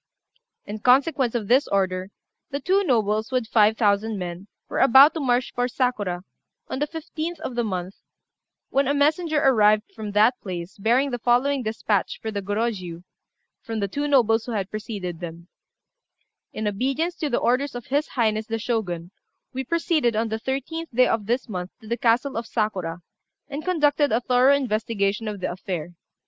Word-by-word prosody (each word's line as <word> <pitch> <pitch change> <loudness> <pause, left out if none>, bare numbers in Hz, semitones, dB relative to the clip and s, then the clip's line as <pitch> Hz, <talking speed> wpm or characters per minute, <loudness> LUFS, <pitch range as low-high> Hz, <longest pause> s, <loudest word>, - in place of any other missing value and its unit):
In 210 +1 -6
consequence 260 +1 +3
of 220 -4 -2
this 260 +5 +4
order, 185 -1 0 0.4
the 280 - -3
two 380 +7 +2
nobles, 220 - +1
with 255 -2 0
five 220 -1 +4
thousand 210 0 +1
men, 180 +1 -6 0.2
were - - -3
about 270 +3 +7
to 325 - -3
march 250 -3 +1
for 245 0 0
Sakura, 215 -8 -1 0.4
on - - -4
the 295 - 0
15th 325 +1 -5
of 260 - -4
the 240 0 0
month, 185 -3 -4 0.7
when 275 0 +2
a 285 - +1
messenger 310 +2 +2
arrived 215 -6 +4
from 215 -2 -6
that 220 +5 +3
place 180 -1 -6
bearing 250 +7 +2
the 245 - -3
following 255 +4 +2
despatch 220 -3 -1
for 220 - -4
the 200 -1 -3
Gorôjiu, 200 -4 -3 0.6
from 225 -1 -4
the 200 - 0
two 285 +9 -2
nobles 225 -6 +3
who 240 - -4
had 195 -2 -3
preceded 200 -6 -5
them 170 -1 -8 1.0
"In 215 0 -3
obedience 270 - -1
to 305 - -2
the 240 - +1
orders 255 +2 +1
of 245 - -6
His 285 +3 0
Highness 220 -3 0
the 225 - -2
Shogun, 190 -7 -3 0.4
we 265 +1 -3
proceeded, 310 -5 +1
on 225 +1 0
the 220 +1 -2
13th 275 +7 -4
day 250 +1 +4
of 215 -3 -1
this 245 +4 0
month, 180 -4 -5
to 220 - -14
the 235 - 0
castle 240 +3 +1
of 230 0 -4
Sakura, 185 -6 -2 0.5
and 285 +2 -5
conducted 295 -5 +2
a 225 - +3
thorough 250 +2 +4
investigation 215 -4 -1
of 205 -2 -5
the - - -1
affair. 175 -2 -5
230 Hz, 180 wpm, -24 LUFS, 205-270 Hz, 1.0 s, about